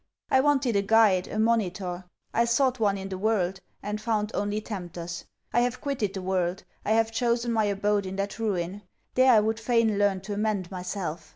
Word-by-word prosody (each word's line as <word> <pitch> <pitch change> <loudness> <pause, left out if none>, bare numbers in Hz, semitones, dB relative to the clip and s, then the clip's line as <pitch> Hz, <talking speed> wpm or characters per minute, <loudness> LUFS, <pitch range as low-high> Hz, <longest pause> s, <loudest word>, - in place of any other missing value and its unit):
I 265 - +5
wanted 275 -5 +2
a 200 - +4
guide, 200 -3 +4
a - - -5
monitor. 190 -5 0 0.3
I 235 - +3
sought 255 +1 +2
one 200 -2 +2
in 195 0 -6
the 190 -1 -5
world, 195 -3 0 0.2
and 210 +1 -3
found 215 -1 -1
only 205 +1 -1
tempters. 175 -5 -6 0.3
I - - +4
have 245 0 -1
quitted 235 -9 -2
the 190 - -4
world. 185 -1 -1 0.2
I 215 - +1
have 225 0 +2
chosen 235 +1 0
my 220 -2 +2
abode 205 0 0
in 190 - -5
that 200 +2 -3
Ruin. 195 -3 -2 0.3
There 255 0 +5
I 225 - +7
would 220 +1 0
fain 225 -2 +2
learn 200 -2 +2
to 205 +2 -5
amend 205 -3 -1
myself. 180 -2 -5
210 Hz, 195 wpm, -27 LUFS, 190-225 Hz, 0.3 s, I